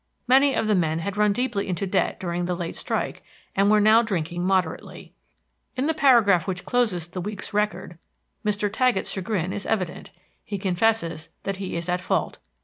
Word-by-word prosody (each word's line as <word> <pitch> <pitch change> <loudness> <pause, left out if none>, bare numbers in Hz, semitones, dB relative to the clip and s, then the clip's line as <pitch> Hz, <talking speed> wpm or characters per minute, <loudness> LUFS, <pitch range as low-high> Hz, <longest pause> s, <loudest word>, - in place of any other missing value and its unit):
Many 270 +2 +5
of 225 - 0
the 215 - +2
men 160 -4 +1
had 185 +4 -3
run 210 0 +3
deeply 220 -2 -1
into 185 +1 -2
debt 185 - 0
during 175 -1 -2
the 180 0 -1
late 170 -1 -5
strike, - - -3 0.3
and 195 +1 +3
were 215 0 +5
now 215 +2 +6
drinking 175 -6 -2
moderately. 190 0 -2 0.6
In 260 - 0
the 320 - +1
paragraph 235 - +4
which 180 -2 -3
closes 215 -9 +1
the 180 +1 -6
week's 205 +2 -5
record 210 -5 -2 0.4
Mr. 210 -1 0
Taggett's 230 0 +1
chagrin 190 -2 -2
is 205 -1 -5
evident. 185 -6 -2 0.3
He 205 - -4
confesses 185 -4 0
that 195 -1 -3
he 190 -2 -5
is 170 0 -3
at 180 0 0
fault. - - -1
195 Hz, 180 wpm, -24 LUFS, 180-215 Hz, 0.6 s, now